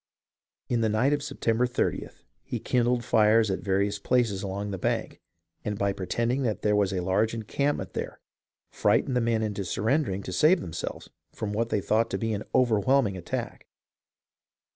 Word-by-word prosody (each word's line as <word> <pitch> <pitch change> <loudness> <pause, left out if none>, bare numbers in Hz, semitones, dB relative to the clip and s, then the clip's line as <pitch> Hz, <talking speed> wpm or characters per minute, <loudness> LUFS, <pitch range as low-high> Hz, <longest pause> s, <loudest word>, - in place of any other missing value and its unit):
In 120 -2 0
the 110 - +2
night 115 +7 +2
of 145 - 0
September 125 -4 0
30th 125 - -2 0.2
he - - -5
kindled 120 -1 +1
fires 110 -1 +4
at 95 - -1
various 100 +1 0
places 110 -3 +1
along 100 +1 -4
the 95 - -4
bank, - - -2 0.4
and 105 -1 -3
by 100 -1 +1
pretending 115 +7 -1
that 110 -5 -2
there 105 -1 +3
was 100 -2 +2
a 90 -2 -2
large 105 +5 +1
encampment 115 -1 -2
there - - -5 0.5
frightened 130 - +2
the 125 - +2
men 115 -1 +1
into 105 -2 -2
surrendering 105 - 0
to 95 - -6
save 155 - +5
themselves 85 - -6 0.2
from 105 -1 -4
what 115 +2 -1
they 105 - 0
thought 110 +4 +1
to - - -2
be 115 -1 -1
an 100 - -3
overwhelming 120 -1 +3
attack. 90 -2 -5
110 Hz, 170 wpm, -27 LUFS, 100-120 Hz, 0.5 s, save